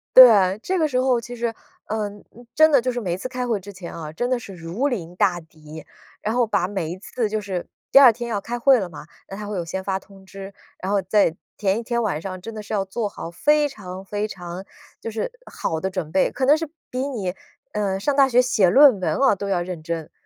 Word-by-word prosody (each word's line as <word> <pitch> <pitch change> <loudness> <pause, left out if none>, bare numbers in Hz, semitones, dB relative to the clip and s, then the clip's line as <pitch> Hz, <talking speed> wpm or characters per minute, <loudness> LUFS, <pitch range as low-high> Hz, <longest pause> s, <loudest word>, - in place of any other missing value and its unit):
对， 210 -6 +8
这 375 - -1
个 315 -3 +2
时 255 -3 0
候 255 -2 +2
其 245 +1 -8
实， 235 -1 -2 0.3
嗯， 205 -1 -4 0.3
真 315 +1 +6
的 280 - +6
就 255 +1 -1
是 245 0 -3
每 180 -4 -2
次 195 - -5
开 250 -1 -4
会 225 -4 0
之 200 +2 -11
前 185 -2 -8
啊， 155 -2 -6
真 245 +8 -2
的 255 - +2
是 225 -5 -9
如 175 +10 -2
临 180 - -4
大 180 -1 +2
敌。 155 -1 -12 0.4
然 220 +2 -2
后 245 -1 +3
把 200 -4 +1
每 190 -6 -3
一 180 - -6
次 230 +3 -2
就 215 0 -2
是 190 -3 -4 0.2
第 - - +6
2 255 -4 +8
天 240 +1 -6
要 210 -3 -1
开 240 +4 -5
会 265 0 +5
了 190 - -3
嘛， 155 -1 -11 0.2
那 195 - -8
它 210 +1 -6
会 205 -1 -4
有 175 - -3
先 190 +3 -4
发 190 0 -1
通 195 0 -17
知， 195 +1 -9 0.3
然 190 - -3
后 200 -1 +2
在 190 -3 +2 0.2
前 200 +1 +1
一 - - -6
天 235 0 -1
晚 180 -8 -1
上 185 +1 -6
真 225 +4 -7
的 215 - -6
是 210 - -7
要 195 -1 0
做 210 +2 -3
好 170 - -8
非 295 - +3
常 190 -8 -9
非 205 +2 -2
常 180 -2 -7 0.4
就 - - -4
是 225 - -3 0.2
好 160 - -2
的 190 - -1
准 185 -5 -4
备， 190 - +2
可 265 - -1
能 285 +3 +6
是 320 -1 -4 0.2
比 255 - -3
你， 205 -10 -3 0.4
嗯， 200 -2 -1
上 280 +8 0
大 275 -1 +5
学 245 -1 +4
写 215 -7 +3
论 260 +1 +7
文 180 - 0
哦 265 -6 +4
都 200 +1 -5
要 185 -3 +1
认 175 -2 -6
真。 165 -1 -5
205 Hz, 265 characters per minute, -23 LUFS, 185-245 Hz, 0.4 s, 对